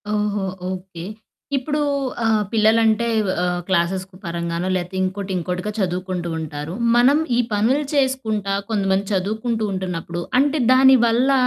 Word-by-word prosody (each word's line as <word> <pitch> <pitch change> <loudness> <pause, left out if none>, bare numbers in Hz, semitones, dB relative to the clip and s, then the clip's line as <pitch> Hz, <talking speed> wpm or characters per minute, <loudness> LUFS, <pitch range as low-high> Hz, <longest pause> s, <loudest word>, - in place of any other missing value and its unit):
ఓహో! 210 -1 -1 0.3
ఓకే. 185 -2 -7 0.5
ఇప్పడూ 295 +3 -1 0.4
ఆహ్, 220 -1 +3
పిల్లలంటే 220 0 +3 0.4
ఆహ్, 180 0 -1
క్లాసెస్ 185 0 +1 0.2
పరంగానో 170 +1 -3
లేతే 180 +1 -3
ఇంకోటి, 190 +1 -3
ఇంకోటిగా 180 +4 -3
చదువుకుంటూ 180 -2 -2
ఉంటారు. 150 0 -5 0.2
మనం 255 +5 +5 0.2
ఈ - - +3
పనులు 240 +8 +2
చేసుకుంటా 225 -8 0 0.2
కొంతమంది 195 -2 +1
చదువుకుంటూ 220 +4 -1
ఉంటున్నప్పుడు 180 -2 -4 0.2
అంటే 290 +2 +2
దాని 265 +1 +7
వల్ల 240 +4 +3
200 Hz, 120 wpm, -21 LUFS, 180-230 Hz, 0.5 s, దాని